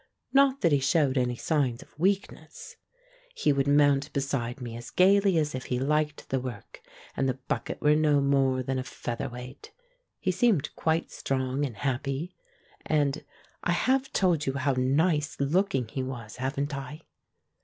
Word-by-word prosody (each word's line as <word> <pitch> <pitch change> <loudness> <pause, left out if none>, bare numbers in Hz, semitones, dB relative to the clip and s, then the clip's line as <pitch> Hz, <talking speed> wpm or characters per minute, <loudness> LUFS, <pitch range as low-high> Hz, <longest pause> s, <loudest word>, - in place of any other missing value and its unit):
Not 275 0 +4
that 170 - +3
he 145 - +4
showed 140 0 +2
any 125 -2 +1
signs 135 -4 0
of - - -27
weakness. 195 +3 -2 0.6
He 150 - +2
would 140 0 0
mount 145 -1 +3
beside 135 -3 -2
me 120 -2 -6
as 120 0 -8
gaily 195 0 +4
as 150 -2 0
if 130 0 -5
he 125 - -1
liked 150 +2 -1
the 135 - 0
work 125 -5 -8 0.3
and 135 - +1
the 130 - 0
bucket 130 - -4
were 150 0 +4
no 150 -2 +3
more 135 -2 +2
than 130 +1 -2
a - - -3
feather 120 -2 -5
weight. 125 +2 -10 0.5
He 185 - 0
seemed 190 - +1
quite 160 +1 0
strong 130 +1 -2
and 120 - -10
happy, 135 - -2 0.5
and 150 -1 0 0.4
I 175 - +1
have 265 +8 +1
told 170 -6 +1
you 135 - +1
how 140 0 0
nice 150 +4 +1
looking 140 - +1
he 130 - -4
was, 120 -5 -6
haven't 140 +3 -2
I? 140 +3 -7
140 Hz, 165 wpm, -28 LUFS, 130-155 Hz, 0.6 s, Not